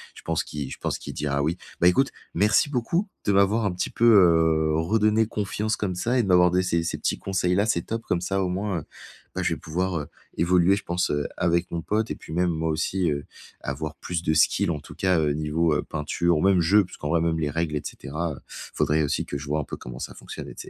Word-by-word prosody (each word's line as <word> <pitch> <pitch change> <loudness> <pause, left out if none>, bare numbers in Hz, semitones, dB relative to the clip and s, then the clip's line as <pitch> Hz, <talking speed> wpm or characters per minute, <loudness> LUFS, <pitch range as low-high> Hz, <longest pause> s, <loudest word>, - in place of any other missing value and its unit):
Je - - -12
pense 80 -1 -1
qu'il 70 -3 -5
je - - -7
pense - - -1
qu'il - - -8
dira: 70 -1 -1
«oui.» 80 +4 0 0.2
Bah 85 - +6
écoute, 135 +10 +4 0.2
merci 105 - +3
beaucoup 150 - 0 0.2
de 100 - +3
m'avoir 100 +3 +3
un 100 - +1
petit 90 - -2
peu, 120 - 0
heu, 80 -7 +5
redonné 105 +6 +2
confiance 105 0 -2
comme 95 -3 -2
ça 120 +8 0
et 120 - +3
de - - -3
m'avoir 90 -1 +5
des 90 +1 +2
ces 85 -2 0
ces 80 - -2
petits - - -1
conseils-là, 95 +1 +1
c'est 95 -7 0
top, 115 0 -4
comme 85 - -1
ça 95 +2 -1
au 90 - -1
moins, 95 -1 -2
heu, - - -9 0.5
bah - - -1
je - - +1
vais - - -6
pouvoir, 90 +1 -2
heu, 75 - -6 0.3
évoluer, 90 +2 +4
je - - -6
pense, 90 -1 -1
heu, 75 -1 -1
avec 85 0 +1
mon 85 - -3
pote 110 +5 -1
et - - -3
puis 80 - -10
même 90 +1 +2
moi 80 0 -1
aussi, 85 +2 0
heu, 70 0 -3 0.4
avoir 75 +3 -4
plus 85 -1 -4
de 80 - +1
skills 80 +2 +3
en 75 - -3
tout - - -13
cas, 95 -3 +2
heu, 75 -2 +1
niveau, 75 +2 +1
heu, - - 0
peinture 80 +2 0
ou - - 0
même 95 -2 +4
jeu 100 +4 +4
puisqu'en 85 -1 -2
même 80 0 +1
les 75 -2 0
règles, 80 0 -1
et 75 - -1
cetera, 80 +4 -4
heu, - - -11 0.3
faudrait 75 +1 +2
aussi 70 - -1
que 70 - -4
je 70 - -8
vois 75 +1 0
un - - -1
peu - - -6
comment 60 0 -9
ça - - -6
fonctionne - - -8
et - - -9
c - - -8
85 Hz, 255 wpm, -25 LUFS, 80-95 Hz, 0.5 s, Bah